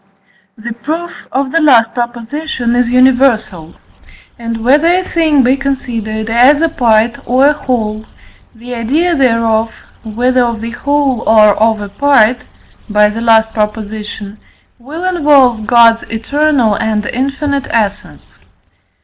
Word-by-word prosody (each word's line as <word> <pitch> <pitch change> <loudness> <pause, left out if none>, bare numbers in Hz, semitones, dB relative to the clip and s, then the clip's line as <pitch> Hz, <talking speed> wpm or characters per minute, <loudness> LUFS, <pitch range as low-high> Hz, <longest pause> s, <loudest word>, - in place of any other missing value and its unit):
The 230 +2 -7
proof 320 +9 -6
of 265 0 -2
the 330 - +1
last 235 -7 +3
proposition 240 +1 -4
is 245 -1 +1
universal; 245 -9 +1 0.6
and 230 -1 -5
whether 290 +6 +3
a 365 +1 +1
thing 315 -6 +1
be 255 +2 +2
considered 230 -6 -4
as 250 +6 +4
a 330 +1 +1
part 230 -5 +1
or 255 +3 +2
a 295 - +4
whole, 220 -6 -4 0.5
the 240 +2 -9
idea 295 +10 -1
thereof, 230 -4 +1 0.3
whether 245 +3 0
of 235 -2 -3
the 230 +1 -6
whole 275 -1 -1
or 215 -2 +5
of 220 0 0
a 205 - -7
part 250 -2 +2 0.5
(by 210 0 +3
the 220 +2 -6
last 225 -1 +2
Prop.), 210 0 -1
will 220 - -10
involve 285 -11 +2
God's 230 -1 +4
eternal 255 0 0
and 215 0 -2
infinite 275 +3 -3
essence. 210 -3 -4
240 Hz, 130 wpm, -12 LUFS, 220-275 Hz, 0.6 s, or